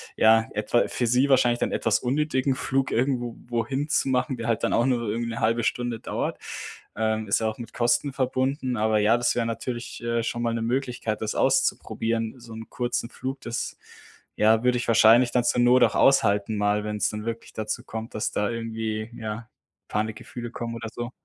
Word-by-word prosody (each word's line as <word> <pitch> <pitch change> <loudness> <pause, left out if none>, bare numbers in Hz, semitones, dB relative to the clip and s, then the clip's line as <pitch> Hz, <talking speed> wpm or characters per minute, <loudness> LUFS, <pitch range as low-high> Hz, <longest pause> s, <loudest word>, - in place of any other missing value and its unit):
ja, 110 0 +5
etwa 105 +3 +1
für 125 - -1
sie 125 +4 +3
wahrscheinlich 120 -3 +4
dann - - 0
etwas 115 - +1
unnötigen 135 0 0
Flug 135 +1 0
irgendwo 120 -1 0
wohin 120 +5 -1
zu 150 -3 +1
machen, 130 +2 +1
der 115 -1 -5
halt 115 -2 0
dann - - +1
auch 120 - +3
nur 120 -3 0
irgendwie 115 +2 -2
'ne 115 - -4
0,5 115 +1 +1
Stunde 120 0 -1
dauert, - - -3 0.6
ähm, 110 0 -1
ist 100 - +2
ja 110 - 0
auch 110 - -3
mit 120 - -9
Kosten 120 +3 +1
verbunden. 130 0 -1
Aber 110 0 +2
ja, 110 +3 +4
das 120 0 +1
wäre 120 -1 0
natürlich, 120 +1 -5
äh, 115 0 0
schon 120 +1 -3
mal 115 -1 0
'ne 115 - -2
Möglichkeit, 120 -2 -2
das 110 -1 -2
auszuprobieren, 115 0 0
so 115 -1 -11
'n 110 0 -9
kurzen 120 -1 -2
Flug. 130 +1 -5
Das, 120 0 -4 0.6
ja, 110 +2 +4
würde 125 0 +3
ich 120 - -3
wahrscheinlich 115 +2 +6
dann 125 - +2
zur 120 0 +2
Not 125 +1 +5
auch - - +3
aushalten 105 -5 +3
mal, 105 0 +1
wenn's 105 -1 -1
dann 105 0 -6
wirklich 115 0 -5
dazu 110 -1 -3
kommt, 110 +1 -7
dass 110 - -2
da 105 - 0
irgendwie, 110 -1 -3
ja, 110 +1 -6 0.4
Panikgefühle 110 +2 -4
kommen 115 -1 -5
oder 115 -1 -6
so. 120 +1 -5
115 Hz, 200 wpm, -25 LUFS, 110-125 Hz, 0.6 s, wahrscheinlich